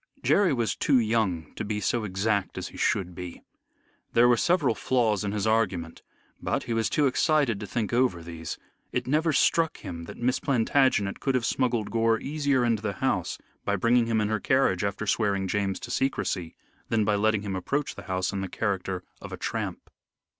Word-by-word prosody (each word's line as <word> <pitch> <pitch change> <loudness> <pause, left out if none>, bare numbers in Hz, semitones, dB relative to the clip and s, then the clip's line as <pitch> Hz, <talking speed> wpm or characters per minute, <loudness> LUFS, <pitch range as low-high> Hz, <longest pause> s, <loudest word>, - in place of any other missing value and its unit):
Jerry 200 -2 +4
was 120 -4 0
too 140 - +3
young 110 -9 0
to - - -5
be 105 0 -2
so 110 +2 0
exact 100 0 -1
as - - -4
he - - -12
should 90 -2 0
be. 90 -1 -8 0.7
There 120 +1 +6
were 120 - +5
several 160 0 +2
flaws 110 -5 +1
in 100 - -1
his 105 -1 -1
argument. 95 -7 0 0.4
But - - -1
he 115 - -3
was 115 0 +1
too 150 - +2
excited 140 -4 +2
to 105 - -6
think 115 -2 -2
over 120 -9 +2
these. 80 -1 -6 0.3
It 125 0 -1
never 155 +4 +2
struck 165 +2 +2
him 85 -4 -7
that - - -9
Miss 125 +2 +1
Plantagenet 125 -5 +2
could 135 -2 0
have 125 -2 +1
smuggled 120 -5 0
Gore 115 -1 +2
easier 140 -3 +1
into 115 -3 +1
the 105 -2 -2
house 95 -5 -1 0.3
by 100 - 0
bringing 115 +3 +3
him 115 -1 +1
in 105 - 0
her 110 0 0
carriage 130 -9 +2
after 100 +1 -2
swearing 100 -2 +1
James 100 0 -1
to - - -6
secrecy, 95 -10 -1 0.3
than 110 -2 +2
by 105 - +2
letting 105 0 +2
him 100 -2 -3
approach 140 +10 -2
the - - -10
house 95 +1 -1
in 100 - -2
the 95 - -4
character 95 -3 -2 0.2
of - - -8
a - - -5
tramp. - - -4
110 Hz, 195 wpm, -27 LUFS, 95-125 Hz, 0.7 s, There